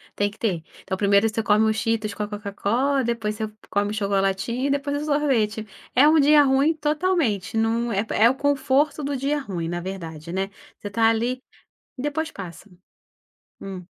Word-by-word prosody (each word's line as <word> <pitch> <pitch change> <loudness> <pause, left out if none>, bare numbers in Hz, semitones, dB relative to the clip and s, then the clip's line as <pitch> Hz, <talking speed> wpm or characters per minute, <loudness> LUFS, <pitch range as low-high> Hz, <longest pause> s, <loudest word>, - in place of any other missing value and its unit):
Tem 205 0 +1
que 210 - -17
ter. 185 -8 -1 0.3
É - - -2
o - - 0
primeiro 200 +2 +4
você 220 +1 -2
come 215 0 +3
o - - +2
Cheetos 220 -1 -1
com - - -6
a - - -3
Coca-Cola, 215 +6 -1
depois 230 -2 -2
você 215 -1 -3 0.2
come 205 0 0
o - - -3
chocolatinho 200 +5 0
e - - -1
depois 285 +1 -1
o - - -4
sorvete. 255 -8 +1 0.3
É 275 +4 +7
um 315 +1 +5
dia 295 +1 +6
ruim 275 +4 +3
totalmente, 300 - 0
não 230 +1 +1
é 200 0 +1
pé 220 -1 0
é 235 - +8
o 265 - 0
conforto 285 +1 +1
do 280 0 -2
dia 280 +3 0
ruim, 180 -10 -4
na 175 0 -2
verdade, 170 -3 -7
né. 190 +1 -1 0.3
Você 205 - -7
está 225 +3 +2
ali, 235 +3 0 0.6
e 250 - -5
depois 315 +3 -2
passa. 185 +2 -9 0.9
Hum. 190 -2 -7
225 Hz, 195 wpm, -23 LUFS, 200-280 Hz, 0.9 s, é